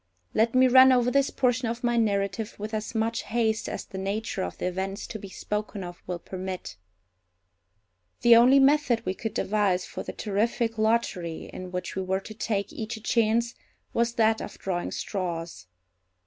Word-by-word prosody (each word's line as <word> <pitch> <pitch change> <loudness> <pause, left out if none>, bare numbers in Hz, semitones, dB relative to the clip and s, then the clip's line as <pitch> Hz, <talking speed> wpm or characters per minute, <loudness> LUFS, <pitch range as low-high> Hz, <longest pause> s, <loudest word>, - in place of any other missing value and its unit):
Let 225 +2 +2
me 255 0 +6
run 260 +1 +8
over 250 -1 +3
this 275 0 +3
portion 250 -1 +1
of 235 +2 -4
my 240 0 +2
narrative 205 -1 0
with 215 +2 -6
as 215 +1 -3
much 225 +1 0
haste 225 -1 0
as - - -5
the 190 - -7
nature 205 +3 -2
of 90 0 -4
the - - -3
events 190 +3 -3
to 220 - -7
be 200 - -9
spoken 210 0 -4
of 175 -1 -9
will 180 -1 -2
permit. 185 - -6 1.5
The 235 -1 +8
only 245 +4 +7
method 275 -3 +3
we 185 - 0
could 220 +3 -5
devise 195 -3 +1
for - - -6
the - - -5
terrific 225 +2 -1
lottery, 215 -7 0
in 185 -1 -7
which 180 0 -4
we 190 - -1
were 190 0 0
to 215 - -10
take 205 -2 -2
each 220 0 -5
a - - -11
chance, 230 +1 +1 0.4
was 235 0 +1
that 220 -1 +3
of - - -7
drawing 180 -2 -2
straws. 170 - -4
220 Hz, 180 wpm, -27 LUFS, 190-235 Hz, 1.5 s, run